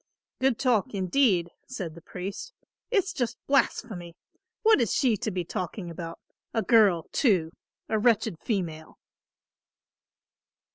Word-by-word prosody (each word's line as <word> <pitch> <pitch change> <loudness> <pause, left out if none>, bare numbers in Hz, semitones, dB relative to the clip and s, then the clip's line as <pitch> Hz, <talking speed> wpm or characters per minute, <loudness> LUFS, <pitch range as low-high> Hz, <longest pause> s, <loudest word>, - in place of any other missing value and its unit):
"Good 260 -3 +2
talk, 245 -3 +1
indeed," 185 -2 +2 0.2
said 190 -11 -5
the 170 - -12
priest. 195 - -7 0.4
"It's 410 -4 +1
just 245 -3 -2
blasphemy. 210 -10 0 0.5
What 440 - +6
is 230 - +1
she 255 -6 +3
to 215 - -2
be 180 -3 -3
talking 175 +1 -4
about, 165 0 -7 0.4
a 225 - +2
girl 205 -8 +5
too, 185 - +2 0.4
a 220 - +1
wretched 215 -5 +2
female." 165 -8 -3
205 Hz, 125 wpm, -27 LUFS, 175-245 Hz, 0.5 s, What